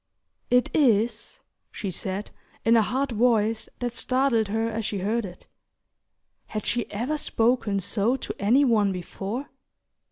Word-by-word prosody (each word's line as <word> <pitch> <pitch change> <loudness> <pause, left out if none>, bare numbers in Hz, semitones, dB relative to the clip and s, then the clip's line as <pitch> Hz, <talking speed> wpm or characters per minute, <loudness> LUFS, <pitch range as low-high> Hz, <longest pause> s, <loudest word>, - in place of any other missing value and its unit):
"It 250 0 +3
is," 235 -5 +1 0.3
she 200 -4 -4
said, 190 +3 -4 0.3
in 230 +1 +5
a 225 - +6
hard 260 +5 -1
voice 225 -1 +1
that 245 -1 -3
startled 255 -3 +1
her 225 +2 0
as 225 0 -3
she 205 - -2
heard 210 +4 -1
it. 180 -1 -11 1.0
Had 215 -1 -5
she 240 -1 0
ever 250 +9 -2
spoken 225 -5 +1
so 205 +5 +1
to 270 - -5
any 245 +8 +4
one 215 -5 +3
before? 195 +8 -5
225 Hz, 140 wpm, -25 LUFS, 205-245 Hz, 1.0 s, a